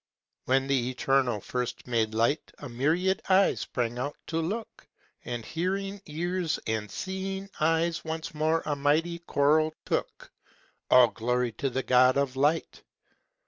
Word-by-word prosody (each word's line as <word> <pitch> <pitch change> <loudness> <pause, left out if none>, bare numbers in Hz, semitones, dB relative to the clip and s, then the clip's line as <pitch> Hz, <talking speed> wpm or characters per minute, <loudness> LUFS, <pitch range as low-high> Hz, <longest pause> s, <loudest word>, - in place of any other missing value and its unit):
When 135 +1 +2
the 130 -3 +1
Eternal 130 -3 +1
first 125 +2 -4
made 110 -3 0
Light 120 +7 +1
A 145 - -8
myriad 160 +10 +1
eyes 190 +1 +4
sprang 120 -1 -3
out 140 +3 -3
to 165 0 -1
look, 215 +8 -5 0.4
And 120 -2 -4
hearing 195 +4 -2
ears 175 +2 -2
and 110 -1 -2
seeing 190 - -5
eyes 165 +1 +1
Once 160 0 -5
more 155 +2 +1
a 150 - 0
mighty 155 +4 +1
choral 155 0 +2
took: - - -3 0.6
All 125 -2 +7
glory 125 +1 -1
to 135 +5 -2
the 130 +1 -2
God 130 +1 +5
of 140 -2 0
Light! 145 +5 0
145 Hz, 140 wpm, -28 LUFS, 125-165 Hz, 0.6 s, All